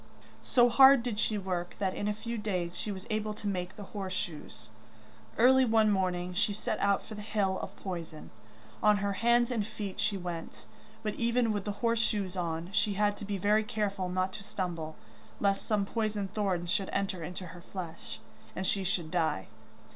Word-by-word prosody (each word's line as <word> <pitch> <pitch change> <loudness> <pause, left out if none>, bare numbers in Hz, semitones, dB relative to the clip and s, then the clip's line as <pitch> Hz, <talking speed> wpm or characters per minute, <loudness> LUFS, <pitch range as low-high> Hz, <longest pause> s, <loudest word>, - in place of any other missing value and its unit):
So 245 -1 +5
hard 265 +1 +8
did 230 -4 -2
she 215 - +2
work, 180 -3 -3
that 190 -2 0
in 205 - -2
a 210 - +1
few 235 +2 -4
days 185 -6 -2
she 210 - -3
was 190 -1 -7
able 215 0 -1
to 210 - -5
make 185 -2 -2
the 205 - -8
horse 195 -3 -3
shoes. 150 -11 -6 0.7
Early 260 +3 +7
one 220 -3 +4
morning 180 -2 0
she 205 +2 +1
set 215 +1 -2
out 200 -1 +2
for 220 - -8
the 210 - -6
hill 205 -3 0
of 195 - -7
poison. 170 -6 -6 0.5
On 210 -1 +5
her 200 0 0
hands 235 +3 +3
and 225 -4 +1
feet 210 -2 -6
she 205 - +1
went, 175 -3 -6 0.4
but 215 -1 -1
even 235 0 +2
with 205 -2 -2
the 205 - -1
horse 230 0 +3
shoes 200 -4 0
on 170 0 -2
she 205 0 +2
had 205 0 +2
to 205 - -7
be 200 0 -2
very 210 +3 +3
careful 205 -5 -2
not 185 +1 0
to 215 - -7
stumble, 170 -5 -4 0.4
lest 195 -1 +1
some 210 -2 +2
poisoned 210 -2 -2
thorns 185 -5 0
should 195 0 0
enter 195 -3 -1
into 180 +3 -6
her 175 +1 -10
flesh, 170 -2 -7 0.4
and 190 - -2
she 195 +1 +1
should 175 -4 -1
die. 160 - 0
200 Hz, 195 wpm, -31 LUFS, 180-215 Hz, 0.7 s, hard